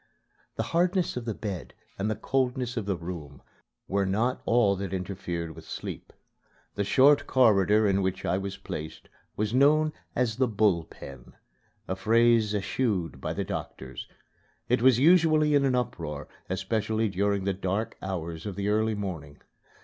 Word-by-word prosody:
The - - -1
hardness 180 +1 +2
of 125 -2 -4
the 115 -3 -3
bed 100 -5 -6 0.2
and 100 +2 0
the 110 - 0
coldness 125 +1 -1
of 110 -4 -3
the 100 - +1
room 85 -6 -8 0.4
were 100 0 0
not 115 +7 0
all 115 -4 +3
that 95 -1 -3
interfered 90 -3 -4
with 80 - -11
sleep. - - -6 0.6
The 100 - -1
short 140 +6 +4
corridor 105 -4 +4
in 100 0 +2
which 95 0 -2
I 95 - +1
was 95 0 -5
placed 80 +1 -7 0.3
was 105 +1 -1
known 150 +4 +4 0.2
as 120 -3 0
the 130 -1 +3
"Bull 100 -6 +2
Pen" 65 -5 -12 0.5
a 95 - -2
phrase 115 +1 +3
eschewed 95 - -1
by - - -2
the - - -2
doctors. 65 -1 -6 0.6
It 125 0 +2
was 130 -1 +6
usually 155 0 +5
in 140 -1 +4
an 130 -2 +2
uproar, 80 - -3 0.2
especially 110 +4 0
during 100 0 0
the 100 0 0
dark 100 +4 -2
hours 85 -2 -4
of 100 - -5
the 100 +1 -1
early 110 +1 +1
morning. 80 -8 -6
105 Hz, 160 wpm, -27 LUFS, 95-125 Hz, 0.6 s, was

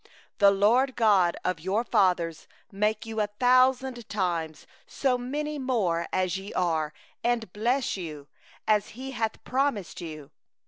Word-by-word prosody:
—11The 200 -1 +6
LORD, 240 +7 +4
the - - -15
God 200 -7 +3
of 180 -2 0
your 190 +7 0
fathers, 175 -7 +1 0.2
make 210 +2 0
you 220 -1 -2
a 210 - +1
thousand 255 -1 +3
times 170 -6 -2 0.2
so 265 -2 0
many 295 +4 -3
more 195 -11 0
as 185 0 0
ye 195 +2 -8
are, 160 -4 0 0.3
and 235 -5 0
bless 240 +3 0
you, 155 -5 -7 0.4
as 210 -1 +3
He 265 +1 -6
hath 225 -3 -3
promised 250 -10 -1
you! 155 -4 -8
210 Hz, 145 wpm, -27 LUFS, 180-245 Hz, 0.4 s, 11The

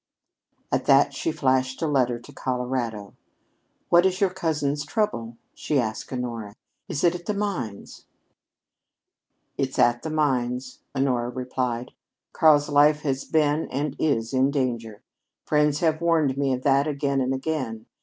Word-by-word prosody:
At - - 0
that - - +5
she 330 - -2
flashed 130 - 0
a - - +1
letter 125 -5 +1
to 120 - -14
Colorado. 125 -5 -3 0.8
"What 175 0 +6
is 190 0 +1
your 195 -2 +2
cousin's 150 -5 -1
trouble?" 145 - -2 0.2
she 150 - -1
asked 110 -3 -3
Honora. 115 -5 -4 0.3
"Is 140 - -3
it 175 -1 +4
at 175 -1 -8
the 210 - -1
mines?" 170 - -4 1.5
"It's 135 -1 -1
at 120 0 +3
the 160 - -4
mines," 130 -5 -1 0.2
Honora 125 -3 +1
replied. 125 -1 -3 0.4
"Karl's 150 -2 +5
life 150 +1 +4
has 135 -2 -2
been 155 0 +1
and 140 +1 -2
is 115 -6 0
in 130 +1 +3
danger. 120 -6 -2 0.4
Friends 150 -1 +2
have 160 -1 +1
warned 160 -5 +2
me 140 -1 0
of 130 0 -2
that 140 +1 +3
again 140 -2 0
and 130 0 0
again. 130 -6 -3
135 Hz, 145 wpm, -25 LUFS, 125-155 Hz, 1.5 s, What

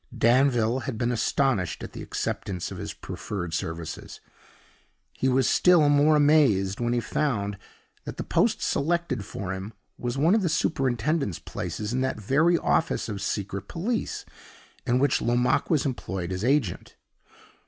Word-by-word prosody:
Danville 120 -1 +3
had 130 -4 -4
been 120 +1 0
astonished 120 - 0
at - - -8
the - - -7
acceptance 90 -3 -3
of - - -7
his - - -4
proffered 90 -5 -6
services; 80 0 -5 0.9
he 130 - 0
was 130 -1 +3
still 170 -5 +5
more 145 +2 +5
amazed 140 -11 +3
when 120 0 0
he 120 - +2
found 110 -6 -1 0.5
that - - -6
the - - -3
post - - +1
selected 160 -6 0
for 95 -1 -5
him 95 +3 -6 0.3
was 120 +1 -3
one 160 +7 +4
of 220 - +3
the 180 - +1
superintendent's 135 - 0
places 105 +2 -5
in 130 - 0
that 130 -4 -1
very 150 - +3
office 160 -6 0
of 100 -2 -4
Secret 100 -1 -3
Police 220 +7 -3 0.6
in 125 0 +3
which 140 +1 +2
Lomaque 120 +2 +1
was 155 -4 +2
employed 95 -9 -3
as 95 +2 -3
agent. 130 - 0
125 Hz, 155 wpm, -26 LUFS, 100-145 Hz, 0.9 s, still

